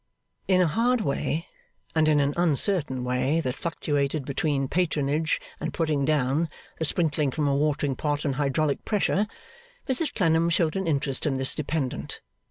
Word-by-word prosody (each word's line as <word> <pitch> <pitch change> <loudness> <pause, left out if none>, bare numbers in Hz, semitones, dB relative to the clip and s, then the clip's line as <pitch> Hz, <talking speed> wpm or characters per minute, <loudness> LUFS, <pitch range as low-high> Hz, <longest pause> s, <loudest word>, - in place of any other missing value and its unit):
In 185 -1 +4
a - - +5
hard 235 +8 +2
way, 160 0 -1 0.5
and 160 -1 +3
in 150 -1 +4
an 140 0 +1
uncertain 160 -5 +2
way 125 +5 +1
that 130 -5 -2
fluctuated 145 -2 -2
between 140 0 0
patronage 155 -2 0 0.2
and - - -4
putting 155 -4 +1
down, 150 +2 +1 0.3
the 160 - 0
sprinkling 150 -3 +1
from 145 +2 -1
a 140 - +2
watering 145 -1 0
pot 145 +1 -2
and 140 - +1
hydraulic 145 +1 0
pressure, 210 0 +1 0.6
Mrs 270 +4 +1
Clennam 165 -3 +3
showed 165 0 +1
an 190 -2 -1
interest 140 -1 0
in 140 - 0
this 130 0 +2
dependent. 150 -3 -3
150 Hz, 160 wpm, -26 LUFS, 140-165 Hz, 0.6 s, a